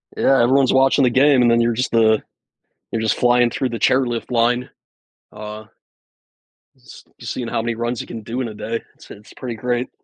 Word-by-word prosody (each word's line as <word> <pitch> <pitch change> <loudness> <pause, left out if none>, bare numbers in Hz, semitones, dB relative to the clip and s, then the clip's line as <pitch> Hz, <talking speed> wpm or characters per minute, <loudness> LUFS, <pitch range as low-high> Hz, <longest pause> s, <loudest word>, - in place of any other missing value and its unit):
Yeah, 135 -2 +3
everyone's 130 +2 +3
watching 135 +1 +3
the 125 - +4
game, 135 +1 +4
and 120 - +4
then 115 - +3
you're 115 0 +1
just, 125 +3 -2
uh, 110 -2 +4 0.7
you're 115 -1 -2
just 110 - +1
flying 120 0 +3
through 130 +2 -2
the 115 - -4
chairlift 125 -3 0
line. 120 +1 +1 0.6
Uh 105 0 -8 1.2
just - - -15
just - - -5
seeing 120 - -5
how 115 - -2
many 115 0 -3
runs 120 +1 -3
you - - -10
can 115 - -7
do 115 +4 -5
in 120 - -3
a 110 - -9
day. 115 +2 -4
It's - - -18
it's 105 +1 -14
pretty 120 -3 -6
great. 125 +2 -2
120 Hz, 205 wpm, -20 LUFS, 115-125 Hz, 1.2 s, the